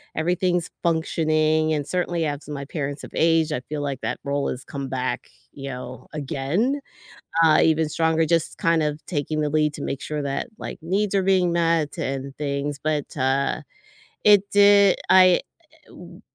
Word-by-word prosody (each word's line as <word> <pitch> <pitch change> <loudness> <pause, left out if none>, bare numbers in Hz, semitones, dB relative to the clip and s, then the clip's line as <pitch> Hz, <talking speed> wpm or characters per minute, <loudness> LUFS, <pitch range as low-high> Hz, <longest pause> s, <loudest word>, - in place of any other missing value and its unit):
everything's 175 +1 0
functioning, 155 -1 +1
and 145 -2 -1
certainly 175 0 -1
as 145 -1 -4
my 140 -2 -5
parents 140 -1 -4
have - - -9
aged, 165 -1 +2
I - - -1
feel 150 -1 -3
like 140 -3 -3
that - - -3
role 140 0 -1
has 130 - -5
come 140 -2 -6
back, 130 -1 -3 0.2
you 140 -1 -7
know, 125 0 -8
again, 155 - -1 0.6
uh, 160 -2 +5
even 160 -1 +3
stronger, 160 +1 +1
just 165 0 0
kind 165 -4 +2
of 150 0 -2
taking 155 -1 -2
the 150 - 0
lead 150 0 +1
to 145 - -7
make 135 -2 -4
sure 150 -1 -3
that, 140 - -3
like, - - -7
needs 195 +4 -1
are 195 - +3
being 185 -2 +2
met 165 -3 +1
and 135 0 -4
things, 140 0 -3
but, 155 -2 -2
uh, 135 0 0 0.6
it 205 -1 +5
did 200 -1 +6
I 185 -1 +6 0.5
w 180 +2 -13
155 Hz, 170 wpm, -23 LUFS, 140-170 Hz, 0.6 s, did